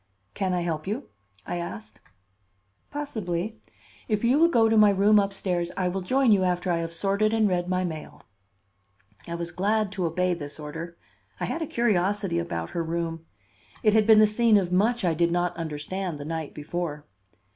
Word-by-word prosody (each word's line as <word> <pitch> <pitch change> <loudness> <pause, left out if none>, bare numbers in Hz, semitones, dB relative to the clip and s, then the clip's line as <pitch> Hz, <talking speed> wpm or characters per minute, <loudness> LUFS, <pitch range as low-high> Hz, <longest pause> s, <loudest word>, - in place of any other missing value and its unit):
"Can 190 -1 -1
I 175 - 0
help 160 -2 -3
you?" 200 - -4 0.4
I 175 - -3
asked. 110 -10 -7 0.9
"Possibly. 220 -9 -4 0.5
If 210 -1 0
you 250 +5 +4
will 335 - +6
go 230 -9 +4
to 225 - +2
my 210 -1 +7
room 205 +2 +5
up 200 0 0
stairs, 180 -3 -1
I 185 -2 +1
will 190 +2 -3
join 255 +5 +2
you 195 -3 +4
after 180 0 0
I 170 - +1
have 165 0 -3
sorted 200 +5 +1
and 220 -1 +3
read 180 -2 0
my 185 0 +1
mail." 160 -4 -6 1.0
I 170 - -4
was 170 0 -4
glad 205 +3 0
to 190 -3 -2
obey 180 +2 0
this 150 -3 -7
order. 165 +3 -7 0.4
I - - -1
had 330 - -3
a 320 - -2
curiosity 200 -6 +1
about 85 - -4
her 170 - -2
room. 165 0 -3 0.6
It 215 - +4
had 215 -1 +4
been 220 -1 +8
the 215 - +8
scene 215 +1 +4
of 180 -3 0
much 215 +4 +2
I 170 - +2
did 170 +1 +1
not 175 0 0
understand 165 +2 -4
the 145 - -7
night 160 -1 -4
before. 150 -1 -4
180 Hz, 190 wpm, -26 LUFS, 170-210 Hz, 1.0 s, been